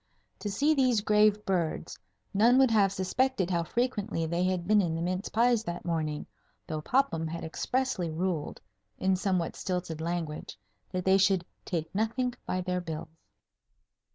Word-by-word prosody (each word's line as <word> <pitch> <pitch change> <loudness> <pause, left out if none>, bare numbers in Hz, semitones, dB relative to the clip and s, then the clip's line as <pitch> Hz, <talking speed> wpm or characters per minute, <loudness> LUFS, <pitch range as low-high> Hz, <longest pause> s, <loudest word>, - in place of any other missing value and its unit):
To 205 - -3
see 290 +10 +2
these 255 -6 +3
grave 210 0 +3
birds, 175 -4 -1 0.3
none 230 +5 +5
would 265 -3 +5
have 200 -3 +4
suspected 195 +1 0
how 170 -1 +2
frequently 205 -4 -1
they 170 +2 0
had 185 -2 0
been 210 0 +5
in 165 -4 -1
the 165 - -3
mince 185 +4 -2
pies 235 0 +3
that 175 -2 -5
morning, 155 -3 -2 0.4
though 155 -1 -4
Popham 165 - +1
had 165 +1 -5
expressly 230 +2 -1
ruled 165 -1 -2 0.4
(in 190 0 +2
somewhat 185 -3 0
stilted 180 -4 -3
language) 165 -6 -4 0.3
that 185 -1 -3
they 190 +1 +5
should 190 -2 +3 0.2
"take 160 -3 -3
nothink 235 +4 0
by 185 - -1
their 180 0 -1
bills." 160 -3 -6
185 Hz, 155 wpm, -29 LUFS, 170-215 Hz, 0.4 s, none